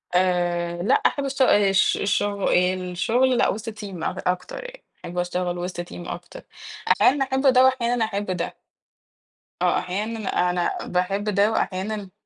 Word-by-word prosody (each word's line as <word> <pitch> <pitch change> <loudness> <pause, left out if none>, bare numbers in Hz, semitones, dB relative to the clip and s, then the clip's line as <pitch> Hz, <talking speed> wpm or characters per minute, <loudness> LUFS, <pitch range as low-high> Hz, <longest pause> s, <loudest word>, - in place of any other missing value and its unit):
آآ 175 -1 +1
لأ 240 +8 +3
إحنا 280 - +2
بنشت 275 0 -3
آآ 205 -6 +5
الش 195 0 +3
الشغ 200 0 0
الشغل 185 +8 +1
لأ، - - +3
وِسط 220 +3 -4
team 195 -6 -7
أك - - -3
أكتر 180 - -2
يعني، - - -11 0.2
أحب 175 +1 -7
أشتغل 175 0 -1
وسط 175 0 -4
team 175 0 -9
أكتر، 175 0 -8 0.5
أحيانًا 270 +1 +4
باحب 265 +1 +3
ده 255 0 +6
وأحيانًا 245 -3 +2
أحب 205 -1 -3
ده. 175 -2 -3 1.1
آه، - - +3
أحيانًا 210 +3 -3 0.2
أنا 175 -1 -1
باحب 185 +3 -1
ده، 205 0 +2
وأحيانًا 200 -1 -2
195 Hz, 150 wpm, -23 LUFS, 180-230 Hz, 1.1 s, ده